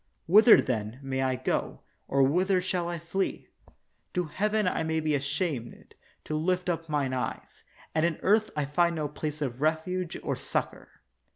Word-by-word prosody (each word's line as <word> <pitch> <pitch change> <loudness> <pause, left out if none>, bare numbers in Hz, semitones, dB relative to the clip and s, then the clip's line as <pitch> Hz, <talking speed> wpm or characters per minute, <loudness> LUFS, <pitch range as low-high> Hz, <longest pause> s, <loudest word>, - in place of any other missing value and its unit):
Whither, 215 +7 +8
then, 110 -1 -2
may 135 -1 -2
I 130 -1 +1
go, 130 - -2 0.3
or 135 0 +3
whither 185 +7 +3
shall 180 -1 -2
I 175 - -3
flee? 170 +4 -3 0.7
To 180 - +2
heaven 210 +5 0
I 180 - 0
may 160 0 0
be 155 -1 0
ashamed 140 -3 -3 0.3
to 155 - -4
lift 180 +3 0
up 165 -2 -2
mine 140 -3 0
eyes, 125 -1 -5 0.3
and 155 - +1
in 170 -2 +1
earth 215 +2 +3
I 150 -1 0
find 170 +4 +2
no 155 -2 -1
place 150 +1 -4
of 130 -1 -4
refuge 160 +3 -1
or - - -1
succor. - - -3
160 Hz, 170 wpm, -28 LUFS, 140-180 Hz, 0.7 s, Whither